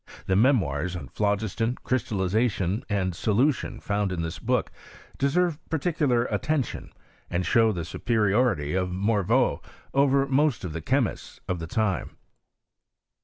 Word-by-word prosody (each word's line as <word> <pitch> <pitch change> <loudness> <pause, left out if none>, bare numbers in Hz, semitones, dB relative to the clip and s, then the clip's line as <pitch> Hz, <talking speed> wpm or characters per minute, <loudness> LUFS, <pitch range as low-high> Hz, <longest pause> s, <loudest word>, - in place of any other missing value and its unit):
The 95 - +1
memoirs 95 - +2
on 90 - -7
phlogiston, 110 +3 -1
crystallization, 105 -3 0
and 95 -3 0
solution, 115 - 0
found 100 -3 -1
in 85 -2 -2
this 80 0 -5
book - - 0 0.5
deserve 160 +3 +1
particular 150 -6 +1
attention, 135 +6 -2 0.4
and 90 +1 -1
show 115 +5 +4
the 85 -5 -4
superiority 105 - +1
of 90 -1 0
Morveau 100 +2 +1 0.3
over 140 0 +3
most 140 0 +1
of 85 - -5
the 85 - -4
chemists 125 - -1
of 90 -2 -2
the 80 - -5
time. 100 0 -1
105 Hz, 125 wpm, -26 LUFS, 95-130 Hz, 0.5 s, show